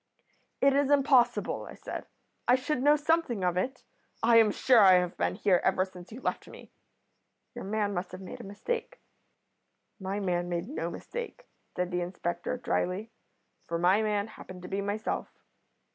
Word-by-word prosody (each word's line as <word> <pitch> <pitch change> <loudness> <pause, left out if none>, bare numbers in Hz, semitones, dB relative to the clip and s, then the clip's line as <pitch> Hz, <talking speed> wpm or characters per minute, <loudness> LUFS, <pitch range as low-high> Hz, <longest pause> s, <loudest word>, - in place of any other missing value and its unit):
"'It 275 0 +5
is 280 0 +2
impossible,' 275 -3 +3
I - - -10
said. - - -7 0.4
'I 245 - +6
should 260 +1 -1
know 295 +2 +6
something 300 - +1
of 180 -1 +1
it. 250 +8 -2 0.4
I 230 0 +6
am 225 -2 +6
sure 245 +3 +4
I 195 -3 +8
have 180 -1 +2
been - - 0
here 190 -3 +3
ever 185 0 +2
since 180 0 -13
you 245 +4 -9
left - - -2
me. - - -13 0.8
Your - - -7
man 205 0 -1
must 180 0 -3
have 185 - -8
made 190 - -8
a - - -10
mistake.' 465 - -4 1.0
"'My 195 +1 -3
man 175 -3 -1
made 175 +2 -2
no 295 - -3
mistake,' 485 +1 -7 0.3
said 180 0 -1
the 180 0 0
inspector, 175 +4 -3
drily, 210 -2 -2 0.6
'for 170 - -1
my 180 +5 +4
man 210 -2 0
happened 185 -4 -11
to - - -7
be 195 +2 -2
myself. 205 +2 -2
205 Hz, 175 wpm, -29 LUFS, 180-255 Hz, 1.0 s, I